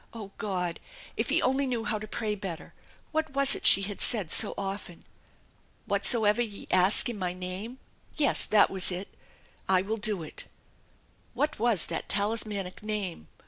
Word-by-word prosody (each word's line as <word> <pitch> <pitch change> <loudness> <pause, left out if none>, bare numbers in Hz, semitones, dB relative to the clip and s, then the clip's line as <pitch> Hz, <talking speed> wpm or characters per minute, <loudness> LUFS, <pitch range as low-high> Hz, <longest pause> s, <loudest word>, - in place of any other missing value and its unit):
Oh, 210 -3 -9
God! 180 -4 -3 0.4
If - - -2
he - - +1
only 265 +2 +1
knew 240 -3 -3
how 220 -2 -2
to 215 - -8
pray 215 0 -3
better! 190 -5 -8 0.4
What 315 -3 -2
was 275 0 +7
it - - +1
she 195 - +7
had 200 0 -4
said 205 -9 +3
so - - +2
often? 195 -3 -6 0.4
" - - -37
Whatsoever 220 -1 +3
ye 215 -4 -5
ask 185 +2 +5
in 235 -4 -5
my 180 -1 -2
name 185 +7 -7 0.2
" - - -32
yes, 295 -3 +4
that 210 -1 +4
was 190 -1 +3
it 180 +2 -7 0.3
" - - -25
I 180 - 0
will 220 +3 -3
do 210 -5 -1
it/' 155 - -8 0.9
What 300 -4 -2
was 225 -7 +1
that - - -5
talismanic 205 -2 -1
Name? 205 - -5
205 Hz, 180 wpm, -27 LUFS, 185-230 Hz, 0.9 s, was